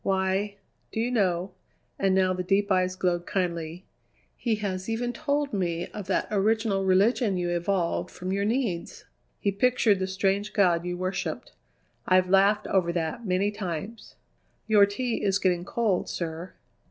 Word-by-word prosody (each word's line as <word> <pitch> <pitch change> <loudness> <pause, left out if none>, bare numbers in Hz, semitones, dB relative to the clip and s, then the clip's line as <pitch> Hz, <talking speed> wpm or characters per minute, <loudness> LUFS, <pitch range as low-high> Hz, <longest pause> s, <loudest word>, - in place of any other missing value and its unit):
Why, 190 +1 0 0.4
do - - -3
you 240 +2 0
know" 185 -5 +1 0.5
and 195 -1 +2
now 185 -1 +3
the 185 - -3
deep 200 +2 +1
eyes 185 0 +2
glowed 175 -2 -1
kindly 170 -2 -2 0.5
"he 230 -3 0
has 195 -2 -4
even 240 +2 -1
told 285 +1 -1
me 175 -3 -1
of 205 -3 -7
that 190 - 0
original 210 -1 +1
religion 195 +2 +3
you 175 -1 -1
evolved 175 0 0
from 185 +1 -5
your 200 +1 0
needs; 215 -6 -2 0.3
he 200 - 0
pictured 220 -1 +2
the 190 - -1
strange 195 +2 0
god 175 -4 +3
you 180 0 -3
worshipped. 185 +1 -3 0.6
I've 185 0 +3
laughed 200 +2 +4
over 180 -3 +1
that 170 +7 -3
many 190 +3 +1
times." 205 +2 -6 0.5
"Your 210 -2 +5
tea 235 +3 -2
is 195 -1 +2
getting 180 -3 0
cold, 210 -4 0
sir." 165 +1 -5
195 Hz, 155 wpm, -27 LUFS, 180-210 Hz, 0.6 s, Your